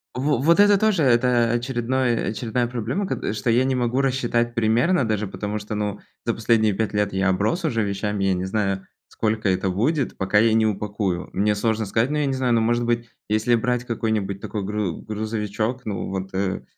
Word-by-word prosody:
Во 140 +1 +1
вот 170 +8 +3
это 205 -1 +6
тоже, 215 -6 +2
это 120 -2 +3
очередное 120 0 0
очередная 120 +2 -1
проблема, 125 - -2
ко 110 - -2
что 110 +2 -2
я 120 +3 +4
не 130 0 +1
могу 125 +1 0
рассчитать 120 -3 0
примерно 120 +6 +2
даже, 105 -1 0
потому 105 +2 -4
что, 105 +1 -6
ну, 105 -1 -3 0.2
за 115 - -1
последние 110 -2 +2
5 110 +1 -2
лет 105 -1 0
я 95 0 +1
оброс 110 - 0
уже 115 -7 0
вещами. 100 0 -2
Я 95 - +3
не 90 +1 -2
знаю, 95 -1 -1 0.2
сколько 110 -2 -1
это 95 +1 0
будет, 130 - 0
пока 95 +2 +1
я 110 +1 +4
не 110 -1 +3
упакую. 100 -3 -2
Мне 105 +2 +1
сложно 110 0 0
сказать, 115 +7 +1
но 150 - 0
я 145 - +1
не 135 - 0
знаю, 125 -2 +1
может 120 +1 +1
быть, 120 -1 -1 0.2
если 110 +3 +2
брать 125 +1 -1
какой-нибудь 110 -4 -2
такой 105 0 -4
гру 105 -4 -2
грузовичок, 110 +2 -3
ну, 100 -3 -3
вот 95 0 -4
э, 95 -1 -1
110 Hz, 195 wpm, -23 LUFS, 105-125 Hz, 0.2 s, это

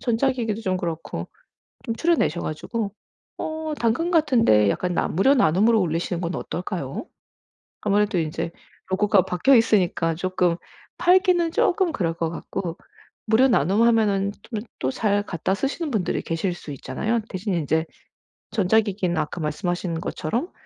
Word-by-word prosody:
전자기기도 235 -2 0
좀 185 -4 0
그렇고 165 -3 -4 0.6
좀 230 - -2
추려내셔 320 - +1
가지고 200 +7 -3 0.5
어 315 0 -4
당근 235 +10 +1
같은 300 -9 +3
데 105 - +5
약간 180 - -1
나 - - +1
무료 230 - +3
나눔으로 220 - +4
올리시는 170 0 -1
건 175 0 -3
어떨까요? 175 - -4 0.8
아무래도 205 -1 +2
이제 160 +1 -3 0.4
로고가 195 0 +3
박혀있으니까 185 -6 +3
쪼끔 180 0 +1 0.4
팔기는 355 -2 +4
쪼끔 365 +1 +2
그럴 175 - -1
것 165 0 -2
같고. 170 +1 -5 0.5
무료 245 +4 +6
나눔 205 - +3
하면은 210 -4 +3
좀 225 0 -5 0.2
또 130 - 0
잘 205 +8 +1
갖다 180 -1 -2
쓰시는 280 - -2
분들이 210 -7 0
계실 170 +2 -2
수 155 - -9
있잖아요. 220 - -2
대신에 185 -1 -2
인제 160 +1 0 0.7
전자기기는 200 -3 +1
아까 155 +3 -2
말씀하신 165 +2 -2
것처럼 235 - -3
195 Hz, 325 characters per minute, -24 LUFS, 170-235 Hz, 0.8 s, 무료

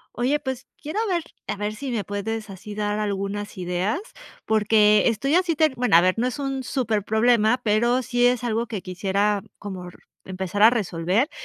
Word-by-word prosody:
Oye, 265 +5 +1
pues 265 -3 -5
quiero 310 +7 -4
ver, 350 -4 0 0.2
a - - -2
ver 210 +1 -3
si 270 +5 -6
me 230 -4 -1
puedes, 205 +2 -4
así, 205 +2 -9
dar 210 0 -1
algunas 205 0 -3
ideas, 180 - -1 0.5
porque 210 -1 +4
estoy 245 +5 0
así 350 -1 +2
ter 310 -2 +3
bueno, 245 -7 +2
a - - +6
ver, 185 +4 +2
no 245 - +2
es 255 - -4
un 270 -2 -3
súper 225 -6 -1
problema, 220 +2 +3
pero 235 +4 +2
sí 245 0 +2
es 245 -1 +1
algo 230 0 -1
que 210 -4 -5
quisiera, 200 +2 0 0.2
como 190 -3 -7
r - - -16 0.3
empezar 190 +1 -4
a 220 - +9
resolver, 195 - 0
215 Hz, 190 wpm, -24 LUFS, 200-245 Hz, 0.5 s, a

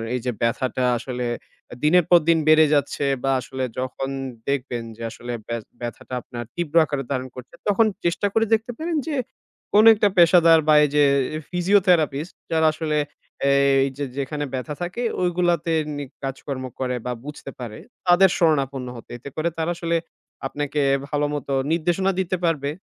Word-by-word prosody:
এই - - -1
যে 125 - +1
ব্যথাটা 125 +2 0
আসলে 125 0 -4 0.5
এ - - -8
দিনের 175 +3 +5
পর 175 - +8
দিন 165 -1 +5
বেড়ে 155 0 +7
যাচ্ছে 145 0 0 0.2
বা 135 - +2
আসলে 130 +1 -5 0.2
যখন 130 +1 -3 0.4
দেখবেন 125 -4 -2
যে - - -12
আসলে 120 0 -7
ব্য - - -7 0.3
ব্যথাটা 120 +1 -7
আপনার 120 +1 -7
তীব্র 170 -3 -4
আকারে 145 -2 -3
ধারণ 130 -1 -2
করছে, 125 +5 -11
তখন 210 +2 +4 0.2
চেষ্টা 175 +4 +1
করে 225 0 +3
দেখতে 225 +2 +1
পারেন 330 +1 -2
যে 310 - -1 0.6
কোন 210 +1 +7
একটা 210 0 +3
পেশাদার 170 -1 +7
বা 155 - +6
এই - - -2
যে 150 - +5 0.3
এ - - -4
ফিজিওথেরাপিস্ট 175 -4 +2 0.2
যারা 160 -1 +3
আসলে 155 -1 -1 0.8
এই 135 - +2
যে 145 - -2
যেখানে 145 +2 -3
ব্যথা 130 +4 -3
থাকে 180 +8 -3 0.2
ওইগুলাতে 175 -2 +1 0.2
নি 145 - -4 0.2
কাজকর্ম 135 0 -4 0.2
করে 125 -1 -1
বা 125 - -2
বুঝতে 150 -2 -8
পারে 115 -3 -7 0.3
তাদের 180 +2 +6
শরণাপন্ন 135 -6 +1
হতে। - - -13
এতে 130 +4 -9
করে 165 +2 +1
তারা 165 +1 -1
আসলে 170 -1 0 0.5
আপনাকে 145 +1 -2 0.3
ভালোমতো 145 -2 -1 0.2
নির্দেশনা 175 +4 +1
দিতে 185 0 0
পারবে 150 -4 0
150 Hz, 165 wpm, -23 LUFS, 135-175 Hz, 0.8 s, পর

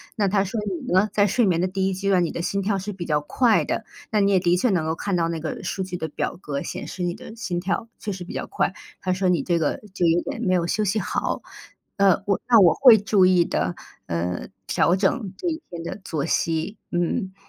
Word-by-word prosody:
那 205 -3 +1
它 195 0 +2
说 195 +4 -4
你 185 -3 -3
呢， 190 +3 +4
在 205 -1 +4
睡 235 +4 +2
眠 175 -4 +2
的 180 - +1
第 190 +1 0
1 - - -1
阶 195 +2 -2
段， 185 -2 +4
你 170 - -1
的 - - -4
心 200 +3 -1
跳 195 0 0
是 205 +2 -5
比 180 -2 -6
较 150 -2 +1
快 225 - +2
的， 230 - -2 0.3
那 210 -1 +2
你 200 0 +3
也 190 - +4
的 175 -1 +2
确 215 +8 +2
能 175 -6 +1
够 160 0 -1
看 195 +2 -2
到 165 -1 +1
那 165 -1 -3
个 155 - -4
数 190 - -2
据 180 -1 -5
的 160 - -3
表 150 - -3
格， 140 -4 -4
显 - - -6
示 180 - -5
你 175 -1 0
的 225 0 -11
心 185 -6 -3
跳 200 +5 -2
确 210 - -4
实 185 -1 -7
比 175 - -9
较 - - -4
快， - - 0 0.3
它 185 - -1
说 185 +1 0
你 180 -2 +2
这 170 -2 +1
个 155 - -1
就 180 -2 0
有 170 +1 +3
点 230 - -5
没 185 -6 +1
有 170 -2 +1
休 215 +4 0
息 210 +2 +1
好。 - - -2 0.6
呃， 195 -1 +4
我 200 - +1
那 235 -2 +7
我 175 -3 +7
会 250 -5 +8
注 200 -2 +3
意 185 -1 +5
的， 90 - -1 0.3
呃， 85 +1 -2 0.2
调 175 - +3
整 195 +1 0
这 - - -4
一 320 -1 -4
天 170 -1 -7
的 170 - -6
作 155 -6 -2
息， 165 +5 -1
嗯。 190 +3 -1
185 Hz, 270 characters per minute, -24 LUFS, 170-205 Hz, 0.6 s, 会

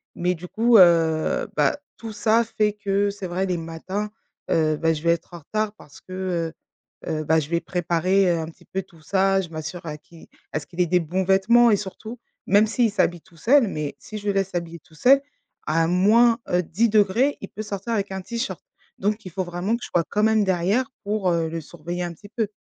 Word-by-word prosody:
Mais 180 +1 0
du 180 +1 -9
coup, 230 +3 +4
heu, 165 -3 +4
bah, - - +2 0.2
tout 225 -1 -7
ça, 220 +2 +3
fait 215 -2 0
que 200 -1 0
c'est 200 -2 -6
vrai 185 +2 -1
les 180 -2 -1
matins, 175 +6 -4 0.4
heu, 155 -2 +2
bah 165 0 +2
je 155 - -5
vais 170 - +4
être 170 +1 -3
en 170 - -7
retard 215 +6 -2
parce 145 -8 -16
que, 180 -3 -3 0.5
heu, - - -5
heu, 155 0 -2
bah, 160 +1 +3
je 150 0 -5
vais 170 0 +1
préparer 180 +2 +1
un 165 -2 -1
petit 165 - -15
peu 190 - -3
tout 170 -4 -20
ça. 195 +2 +2
Je 170 - -8
m'assure 160 +2 -7
à 150 -1 -5
qui 165 +2 -17 0.2
à 150 - -1
ce 145 - -12
qu'il 180 0 -3
ait - - +4
des 180 +2 +3
bons 180 +4 -1
vêtements 220 +6 +5
et - - +5
surtout, 215 +4 -7 0.3
même 205 +2 +5
s'il 230 -1 +1
s'habille 175 -5 +1
tout 170 -3 -22
seul, 245 - +4
mais 150 -5 -4
si 215 - -8
je 205 0 -7
laisse 195 -1 +1
s'habiller 170 -1 -4
tout 160 - -22
seul 275 - +5 0.5
à 165 +1 +2
moins, 225 +6 +4
heu, 180 0 +2
10°, 220 - +2
il 200 - -7
peut 215 - -7
sortir 205 +2 -4
avec 200 -2 -1
un 190 0 -4
t-shirt. 235 +6 -4 0.4
Donc 210 +2 -1
il 185 - -7
faut 185 +2 -2
vraiment 175 +5 -2
que - - -12
je - - -7
sois 170 - +2
quand 210 +1 0
même 220 -1 +4
derrière 195 +8 +1
pour, 205 -2 0
heu, 165 -1 0
le 165 0 -4
surveiller 175 +3 -6
un 175 -1 -4
petit 205 +5 -15
peu. 220 -1 -1
190 Hz, 225 wpm, -23 LUFS, 170-210 Hz, 0.5 s, vêtements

